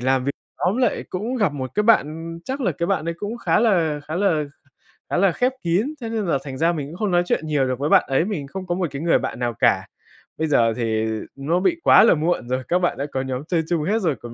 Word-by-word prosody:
làm 130 0 +1
vi 140 - 0 0.3
nhóm 190 +5 +1
lại 255 0 +1
cũng 220 +8 -3
gặp 205 - +1
một 130 -3 -5
cái 210 - +2
bạn, 165 -6 +1
chắc 265 +2 -4
là 190 -9 +1
cái 170 +3 -2
bạn 195 -4 0
ấy 170 - -2
cũng 210 +3 -4
khá 225 - +2
là 170 -10 +2
khá 155 +3 -4
là 180 -6 +2 0.7
khá - - 0
là 190 0 +4
khép 250 +8 +1
kín, 180 +9 +1
cho 230 - -5
nên 225 -2 -2
là 165 -6 +1
thành 135 -2 -7
ra 165 +4 +3
mình 145 -4 -4
cũng 160 - -9
không 210 -1 -1
nói 175 0 +3
chuyện 160 - -1
nhiều 145 -3 +1
được 130 -1 -2
với 145 +2 -1
bạn - - +6
ấy, 135 +5 +1
mình 180 -9 -4
không 185 +5 -7
có 175 - 0
một 180 -2 -1
cái 140 +1 -5
người 170 0 +3
bạn - - -4
nào 120 -1 -1
cả. - - +2 0.5
Bây 160 - 0
giờ 115 -6 +3
thì 110 -2 -1 0.3
nó 150 +6 0
bị 335 - +1
quá - - +7
là 230 - +6
muộn 160 -4 -1
rồi, 130 0 -1
các 180 - +2
bạn 175 - 0
đã 140 - -2
có 130 - -1
nhóm 130 +1 -4
chơi 170 -2 +1
chung 170 -3 0
hết 210 +7 +1
rồi, 165 -7 +1
còn 120 -1 -8
165 Hz, 275 wpm, -22 LUFS, 140-195 Hz, 0.7 s, quá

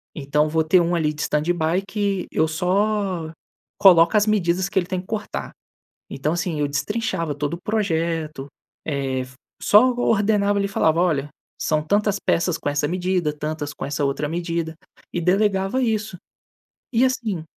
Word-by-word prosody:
Então, 150 +1 +1
vou 160 +1 +1
ter 165 +4 +4
um 170 +1 0
ali 155 -2 0
de 150 - -7
standby 165 +3 0
que 200 -3 -1
eu 160 - +2
só 185 0 0 0.5
coloco 175 0 +6
as 210 - +4
medidas 190 -3 +1
que 195 - +1
ele 175 - -2
tem 185 -1 -2
que 185 - -20
cortar". 215 -1 -4 0.6
Então, 145 +3 -2
assim, 175 -3 -2
eu 145 - +1
destrinchava 165 0 -2
todo 145 +2 -2
o 170 - -10
projeto, 165 -8 -1 0.4
eh, 135 -3 -1 0.4
só 230 +5 +6
ordenava 205 -3 +2
ali 200 - +1
e - - -5
falava: 165 -4 +2
"Olha, 150 -6 +1 0.3
são 155 -1 +1
tantas 205 +4 +1
peças 175 -2 +1
com 155 - -3
essa 145 0 0
medida, 180 -2 0
tantas 150 0 -4
com - - -6
essa 145 +1 -2
outra 140 +2 -1
medida." 170 0 -3 0.4
E 175 - -1
delegava 195 +5 +1
isso. 215 -4 -1 0.8
E 235 +2 +4
assim, 225 -10 -1
175 Hz, 165 wpm, -22 LUFS, 155-200 Hz, 0.8 s, coloco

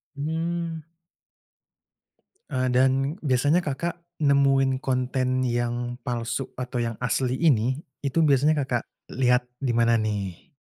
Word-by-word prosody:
Mmm. 165 +2 -3 1.7
Eee, 130 -2 0
dan 135 +4 +2
biasanya 145 +6 +2
Kakak 170 +4 -3 0.2
nemuin 135 -2 +3
konten 130 0 0
yang 120 0 -1
palsu 120 +1 -3
atau 125 0 -3
yang 115 -1 -3
asli 125 +1 0
ini, 130 -4 +2 0.2
itu 140 +3 0
biasanya 150 0 +4
Kakak 120 -2 0 0.3
lihat 125 -1 +2 0.2
di 125 - +1
mana 115 0 +3
nih? 105 - -3
130 Hz, 115 wpm, -25 LUFS, 120-145 Hz, 1.7 s, biasanya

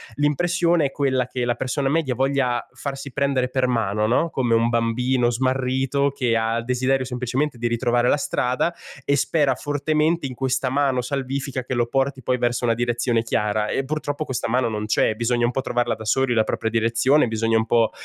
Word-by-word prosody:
l'impressione 170 +2 +2
è 135 - -1
quella 130 -3 0
che 125 -1 -3
la 120 -1 0
persona 135 +2 -1
media 145 -4 0
voglia 130 -2 0
farsi 140 -1 -6
prendere 140 -2 +1
per 130 0 0
mano, 110 -3 0
no, 145 +8 +2
come 120 -3 +1
un 115 +1 +2
bambino 120 +2 +1
smarrito 130 +2 0
che 125 -4 0
ha 115 +1 0
il 115 - -4
desiderio 130 +1 0
semplicemente 125 +2 -2
di 120 - 0
ritrovare 120 +1 +1
la - - +3
strada 130 +4 -1 0.3
e 140 - +2
spera 145 0 +2
fortemente 150 +3 0
in 130 - -4
questa 130 0 -1
mano 135 -2 +1
salvifica 135 +1 -4
che 130 +1 -5
lo 120 -1 +1
porti 135 0 -1
poi 125 +1 +1
verso 120 0 -1
una 115 -1 +3
direzione 120 0 0
chiara, 105 -2 -1
e 135 - -1
purtroppo 150 +1 -3
questa 130 -6 -3
mano 120 0 +1
non 105 -1 -3
c'è. 110 0 +1
Bisogna 120 +1 0
un 120 - 0
po' 135 - -2
trovarla 120 -1 0
da 110 - -10
soli 130 +2 +1
la 110 -1 +2
propria 110 - -2
direzione, 115 +5 +3
bisogna 115 0 +1
un 110 - +1
po', 115 0 +2
125 Hz, 195 wpm, -22 LUFS, 120-135 Hz, 0.3 s, la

